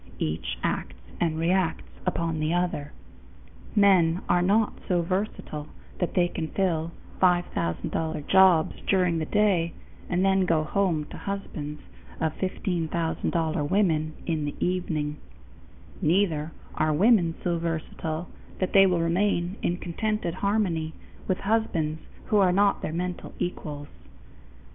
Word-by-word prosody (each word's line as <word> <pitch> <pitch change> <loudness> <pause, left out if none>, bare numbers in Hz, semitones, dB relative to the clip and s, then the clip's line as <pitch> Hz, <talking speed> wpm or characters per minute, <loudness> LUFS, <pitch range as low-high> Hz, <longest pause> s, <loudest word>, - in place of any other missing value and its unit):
Each 80 +1 -2
acts - - -2 0.2
and 160 -2 +1
reacts 175 +1 +1 0.2
upon 165 -1 0
the 155 +2 +1
other. 170 -5 -1 0.8
Men 185 -5 +4
are 175 - +3
not 205 +4 +3
so 175 -2 +2
versatile 180 -5 -3 0.3
that 180 - -1
they 175 -1 +4
can 160 -2 -4
fill 165 -3 0 0.3
$5000 160 - 0
jobs 190 -4 +5
during 180 -4 +3
the 155 - -3
day 195 -6 +2 0.4
and 180 +1 +2
then 190 -1 +3
go 160 -2 +3
home 165 -1 +1
to - - -14
become 200 0 -2
husbands 150 -5 -7 0.4
of 160 -1 0
$1500 165 -4 -1
women 160 -6 +2
in 160 -3 -1
the 145 - -4
evening. 160 -5 -1 0.8
Neither 165 -2 +2 0.2
are 155 0 +1
women 175 0 +4
so 170 -1 0
versatile 165 0 -3 0.3
that 185 - -2
they 195 -1 +8
will 180 -2 +2
remain 175 +1 +1
in 175 - 0
contented 185 +1 -2
harmony 185 -5 0 0.3
with 185 -1 0
husbands 170 -8 0 0.2
who 215 - +2
are 190 -3 +5
not 200 +2 +3
their - - -3
mental 180 +2 -4
equals. 150 -4 -4
175 Hz, 130 wpm, -26 LUFS, 160-190 Hz, 0.8 s, they